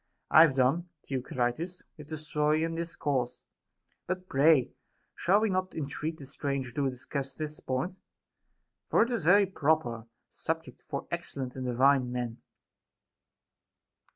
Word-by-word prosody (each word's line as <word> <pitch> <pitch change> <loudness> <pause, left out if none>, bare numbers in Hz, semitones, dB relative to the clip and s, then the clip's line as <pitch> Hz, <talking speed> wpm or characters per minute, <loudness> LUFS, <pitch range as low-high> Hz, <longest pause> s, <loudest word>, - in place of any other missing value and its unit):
I 155 - +9
have 155 -5 +6
done, 135 +7 +2 0.2
Theocritus, 130 +6 -2
with 150 -2 -11
the 155 0 -4
story 150 +1 +1
and 165 0 -1
discourse; 145 -7 -2 0.6
but 185 0 -3
pray, 140 -2 +4 0.4
shall 195 +5 +3
Ave 220 - +2
not 185 -1 -1
entreat 155 +1 -3
the 140 - -9
stranger 140 -1 -3
to 135 +2 0
discuss 135 +1 -4
this 155 -1 -4
point 160 +9 -3 0.5
] - - -51
For - - +5
it 235 - -3
is 235 - 0
a - - +5
very 200 +2 +7
proper 145 - 0 0.2
subject - - -4
for - - -5
excellent 130 -2 -4
and 130 -1 -4
divine 130 +1 +3
men. 120 -2 -4
145 Hz, 145 wpm, -30 LUFS, 130-165 Hz, 0.6 s, I